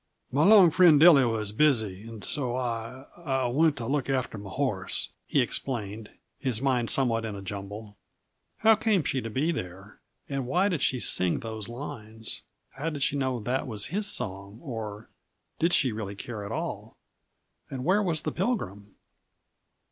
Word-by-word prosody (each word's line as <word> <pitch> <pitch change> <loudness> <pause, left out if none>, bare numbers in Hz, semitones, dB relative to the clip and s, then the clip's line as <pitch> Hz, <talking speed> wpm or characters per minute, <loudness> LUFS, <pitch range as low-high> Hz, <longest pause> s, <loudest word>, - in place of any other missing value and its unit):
"My 145 +4 +2
long 195 -4 +7
friend, 170 -3 +6
Dilly, 155 -5 +8
was 110 -3 -1
busy, 110 -6 +2
and 115 -2 -9
so 125 -4 0
I 125 +1 -4
I 135 -6 -1
went 150 +4 +2
to 120 - -4
look 140 +1 -1
after 130 -5 -1
my 100 -1 -9
horse," 105 -6 -1 0.2
he - - +2
explained, 110 -4 -3 0.3
his 125 -6 0
mind 125 -3 +1
somewhat 115 -4 +2
in 110 -2 -4
a 100 - -7
jumble. 100 +2 -7 0.6
How 225 0 +7
came 215 -5 +1
she 130 -1 0
to 115 - -5
be 140 +9 0
there, 95 - -7 0.3
and 135 -3 -3
why 180 +9 +2
did 165 -8 -2
she 130 - +2
sing 90 -6 +2
those 110 -1 -6
lines? 115 -4 -7 0.3
How 150 +4 -4
did 145 -3 -3
she 145 - +1
know 130 -3 -1
that 130 +5 -2
was 105 -4 -2
his 210 +1 +2
song, 100 - -1
or 110 -6 -6 0.5
did 170 +2 +2
she 130 -7 +4
really 105 -2 -5
care 105 +1 -6
at - - -7
all? - - -5 0.7
And 130 -2 -5
where 195 +5 +3
was 165 -6 -1
the - - -2
Pilgrim? 105 - -3
125 Hz, 170 wpm, -27 LUFS, 105-145 Hz, 0.7 s, Dilly